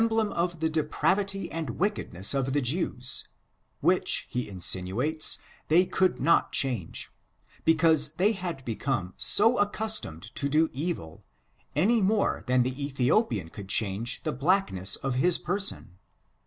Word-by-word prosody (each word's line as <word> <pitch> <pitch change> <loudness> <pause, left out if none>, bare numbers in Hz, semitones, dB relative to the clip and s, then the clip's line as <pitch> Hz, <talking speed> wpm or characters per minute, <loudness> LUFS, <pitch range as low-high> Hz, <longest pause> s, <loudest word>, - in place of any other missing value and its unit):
65 225 0 +1
blem - - -7
of 170 -1 -2
the 160 - +1
depravity 190 +5 -1
and 160 -7 -5
wickedness 155 - 0
of 135 -1 -1
the 145 - +1
Jews, 125 -2 -1 0.5
which, - - +3
he 125 -2 -3
insinuates, 95 - +1 0.3
they 175 +4 +4
could 185 0 0
not 170 - +2
change, 120 -11 -1 0.5
because 160 -2 +4
they 195 +6 +3
had 180 - -6
become 115 -5 -3
so 225 +4 +4
accu3tomed 205 - -2
to 140 - -2
do 155 +3 +2
evil, 140 - -5 0.5
any 225 +3 +3
more 200 +2 +1
than 125 0 +3
the 130 +3 -4
Ethiopian 130 - 0
could 95 +2 -10
change 105 +3 0
the - - -2
blackness 135 - +1
of 135 -1 -3
his 180 +2 +4
person. 180 - -4
150 Hz, 140 wpm, -27 LUFS, 120-185 Hz, 0.5 s, they